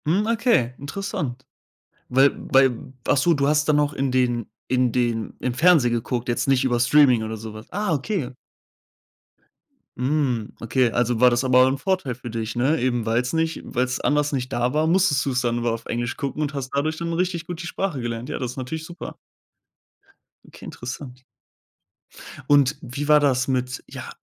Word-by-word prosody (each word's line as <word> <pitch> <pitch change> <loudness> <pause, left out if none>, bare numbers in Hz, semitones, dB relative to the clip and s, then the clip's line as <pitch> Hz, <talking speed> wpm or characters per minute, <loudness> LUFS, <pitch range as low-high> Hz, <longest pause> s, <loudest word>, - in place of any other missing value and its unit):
Hm, 185 +8 +2
okay, 225 - +2
interessant. 145 -4 -4 0.7
Weil 135 +2 +5 0.2
weil 130 -2 +3 0.2
ach - - +4
so, 170 +6 +3
du 140 -2 +1
hast 150 +1 +2
dann 150 - +4
noch 150 0 +1
in 135 -2 -1
den 120 -3 +1 0.2
in 125 -1 +2
den 115 -2 -1
im 125 - -2
Fernsehen 150 -3 +4
geguckt, 120 +1 -2
jetzt 120 +2 -1
nicht 135 -1 +3
über 120 -2 +1
Streaming 125 -3 +5
oder 110 0 -4
so 110 0 -8
was? 110 +1 -12
Ah, 205 -3 -1
okay. 145 - -2 1.7
Hm, 125 -4 -1
okay. 125 +2 +2
Also, 120 -1 0
war 125 +1 +7
das 120 +1 +1
aber 130 0 +5
'n 135 +1 0
Vorteil 185 -5 -1
für 120 0 -9
dich, 115 0 -4
ne? 135 +7 +2
Eben 120 -2 0
weil's 120 +4 0
nicht 165 0 0
weil's 125 +1 -1
anders 150 +1 +1
nicht 130 -2 -3
da 120 +2 0
war, 155 +1 +2
musstest 170 -5 +3
du's 130 -2 0
dann 120 -1 0
immer 120 -1 0
auf 115 0 -5
Englisch 120 +1 -3
gucken 140 +2 -4
und 150 0 -2
hast 135 -2 -4
dadurch 150 +3 0
dann 170 0 -3
richtig 170 0 -1
gut 175 0 -6
die 175 - -6
Sprache 185 -5 -3
gelernt. 120 0 -4
Ja, - - -4
das 125 -2 -3
ist 125 - -13
natürlich 155 +5 -5
super. 175 0 -8 1.3
Okay, - - -13
interessant. 125 +1 -8 1.3
Und 145 0 +4
wie 145 +1 -5
war 150 0 +6
das 130 -4 +1
mit, 125 -1 -2
ja - - -8
130 Hz, 185 wpm, -23 LUFS, 120-150 Hz, 1.7 s, war